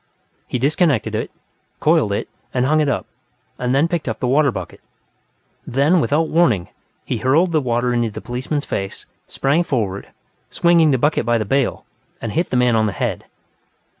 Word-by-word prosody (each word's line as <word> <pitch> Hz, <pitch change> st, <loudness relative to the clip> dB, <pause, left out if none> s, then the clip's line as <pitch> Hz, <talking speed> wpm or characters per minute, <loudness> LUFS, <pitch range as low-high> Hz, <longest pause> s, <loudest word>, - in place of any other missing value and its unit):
He -, -, -2 dB
disconnected 140 Hz, -, +1 dB
it, -, -, -2 dB, 0.5 s
coiled -, -, +3 dB
it -, -, -2 dB, 0.3 s
and 125 Hz, 0 st, +2 dB
hung 155 Hz, +3 st, +3 dB
it 150 Hz, -2 st, +2 dB
up, -, -, -1 dB, 0.5 s
and 125 Hz, +1 st, 0 dB
then 145 Hz, +4 st, +3 dB
picked 170 Hz, -6 st, -2 dB
up 110 Hz, -, -4 dB
the -, -, -1 dB
water 140 Hz, +2 st, +3 dB
bucket. -, -, -7 dB, 0.9 s
Then, 145 Hz, +7 st, +3 dB
without 155 Hz, +2 st, +1 dB
warning, 140 Hz, -, +2 dB, 0.4 s
he -, -, -2 dB
hurled 160 Hz, +8 st, +2 dB
the 155 Hz, -2 st, +2 dB
water 120 Hz, -1 st, 0 dB
into 120 Hz, -1 st, +1 dB
the 105 Hz, -, -7 dB
policeman's 130 Hz, +4 st, -3 dB
face, 95 Hz, 0 st, -4 dB, 0.2 s
sprang 140 Hz, +5 st, +1 dB
forward, 110 Hz, -, -2 dB, 0.4 s
swinging 170 Hz, -2 st, +4 dB
the 135 Hz, -, +3 dB
bucket 145 Hz, +3 st, +1 dB
by 120 Hz, +1 st, +2 dB
the 110 Hz, -, -2 dB
bale, 135 Hz, +4 st, 0 dB, 0.3 s
and 115 Hz, -, -4 dB
hit 170 Hz, +8 st, -1 dB
the 125 Hz, -, 0 dB
man 125 Hz, -1 st, +3 dB
on 110 Hz, -1 st, +2 dB
the 100 Hz, -, -3 dB
head. -, -, -2 dB
135 Hz, 180 wpm, -20 LUFS, 120-155 Hz, 0.9 s, swinging